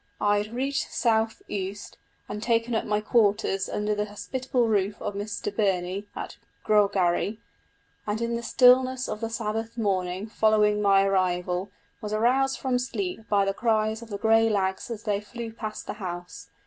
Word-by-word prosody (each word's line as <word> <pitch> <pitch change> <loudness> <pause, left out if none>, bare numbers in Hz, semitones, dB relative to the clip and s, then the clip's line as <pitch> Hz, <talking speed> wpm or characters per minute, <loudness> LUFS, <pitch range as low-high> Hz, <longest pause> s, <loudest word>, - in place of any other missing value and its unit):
I 205 0 +3
had 210 +1 -4
reached 270 +3 -2
South 225 -1 +1
Uist, 200 +1 -5 0.3
and 210 0 -5
taken 230 +1 +1
up 220 - 0
my 210 0 0
quarters 205 -3 +2
under 210 0 -1
the 210 0 -1
hospitable 245 +4 -2
roof 205 -2 0
of - - -3
Mr 205 0 -4
Birnie, 195 -1 0
at - - -6 0.3
Grogarry... 200 -1 +2 0.7
and 210 +1 -1
in 235 0 -1
the 235 - -3
stillness 255 +2 +4
of 215 - -5
the 225 - -2
Sabbath 225 0 -3
morning 190 -3 -1
following 215 -1 +2
my 195 -1 +5
arrival 180 -1 0 0.3
was 210 0 -4
aroused 255 +5 +2
from 255 -2 0
sleep 260 - -4
by 200 -1 +3
the 195 - 0
cries 220 0 +1
of 230 - -11
the 200 - -4
grey 225 +1 +4
lags 190 0 -1
as 225 -2 -6
they 205 -2 0
flew 225 +2 -7
past 215 -2 -6
the - - -4
house. 175 -4 -7
210 Hz, 170 wpm, -26 LUFS, 200-230 Hz, 0.7 s, my